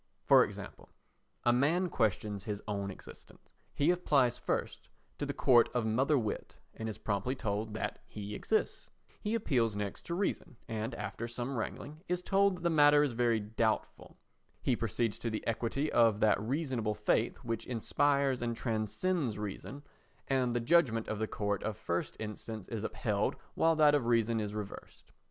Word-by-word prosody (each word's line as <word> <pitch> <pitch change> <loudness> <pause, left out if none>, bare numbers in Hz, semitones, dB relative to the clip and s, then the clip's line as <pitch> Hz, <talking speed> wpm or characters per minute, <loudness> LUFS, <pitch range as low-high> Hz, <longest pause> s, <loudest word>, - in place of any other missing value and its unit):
For - - +7
example: - - -8 0.5
A 120 - +4
man 160 +9 +2
questions 105 - -1
his 105 -2 -4
own 100 -2 -2
existence; 95 - -13 0.2
he 145 +4 +3
applies 140 -9 +2
first - - -3 0.3
to - - -2
the - - -1
court 120 -3 +5
of 120 -2 +1
mother 130 +7 +2
wit 110 -4 -3 0.2
and 110 0 -5
is 110 - -6
promptly 105 +5 -1
told 105 -2 -3
that - - -3
he 105 0 -7
exists; - - -1 0.3
he 210 +2 -1
appeals 120 - +1
next 100 -1 -4
to 170 - -2
reason 170 - -2
and, 110 0 -3
after 105 +3 -5
some 120 +3 -4
wrangling, 145 +6 -5
is 180 0 -1
told 195 0 +3
that 175 - -11
the 170 - +3
matter 145 -1 +6
is 140 -4 0
very 115 -1 +2
doubtful; 110 +1 -2 0.5
he 130 - +2
proceeds 115 0 -1
to 115 - -2
the 110 - -4
equity 120 +6 -1
of 115 -3 +4
that 105 -2 +3
reasonable 125 -3 -1
faith 105 +2 +1
which 115 -2 -3
inspires 135 +2 +1
and 120 -1 -1
transcends 115 - -1
reason, 105 +7 -6 0.4
and 130 -3 +1
the - - +2
judgment 120 -4 +3
of 110 - -2
the 110 - 0
court 100 -2 -2
of 110 -1 -3
first 85 -4 -3
instance 110 -1 -6
is 110 -2 -4
upheld 105 -2 -1 0.2
while 165 0 +3
that 150 -2 +5
of 140 -5 +2
reason 115 -1 +2
is 105 -1 -3
reversed. 105 -2 -8
115 Hz, 170 wpm, -32 LUFS, 105-140 Hz, 0.5 s, For